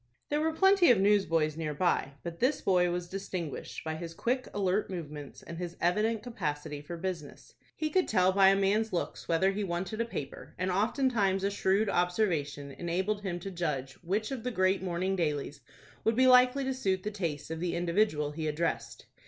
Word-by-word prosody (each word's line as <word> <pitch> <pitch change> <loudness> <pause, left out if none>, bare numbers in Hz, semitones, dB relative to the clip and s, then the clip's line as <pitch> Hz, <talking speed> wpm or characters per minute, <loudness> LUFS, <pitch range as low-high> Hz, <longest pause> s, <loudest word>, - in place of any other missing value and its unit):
There 295 +1 +1
were 320 +1 +1
plenty 385 +2 +5
of 235 -5 +6
newsboys 180 -7 +3
near 155 -2 -3
by, 150 -4 +1
but 170 -1 -6
this 265 +4 +2
boy 180 -2 +3
was 175 0 -3
distinguished 185 -4 -5
by 160 - -3
his 165 0 -7
quick, 255 +6 -1
alert 200 0 0
movements, 150 -6 -7
and 170 0 -8
his 175 -1 -5
evident 210 +5 +1
capacity 150 -10 -4
for 170 +4 -7
business. 170 -5 -6 0.2
He 310 -1 -2
could 370 +2 +2
tell 185 -3 +3
by 190 0 +5
a 195 - +6
man's 205 +3 +1
looks 175 - -3
whether 170 +4 +3
he 205 +1 -2
wanted 190 +4 -2
a - - 0
paper, 145 -11 -7
and 185 +1 -1
oftentimes 205 -1 +1
a 200 - +1
shrewd 200 +1 +1
observation 175 -7 0
enabled 185 +7 -2
him 180 -3 -3
to 195 - -5
judge 150 -7 -2
which 205 +7 -1
of 265 -3 -3
the 250 - -1
great 185 -4 +2
morning 185 +1 -1
dailies 150 -4 -2 0.4
would 225 - +2
be 260 +2 +4
likely 255 +1 +6
to 265 0 -1
suit 190 -8 -1
the 210 - -2
taste 160 -7 -4
of 160 - -3
the 175 0 -1
individual 170 -4 +1
he 155 +1 -3
addressed. 155 +3 -2
185 Hz, 195 wpm, -30 LUFS, 165-215 Hz, 0.4 s, of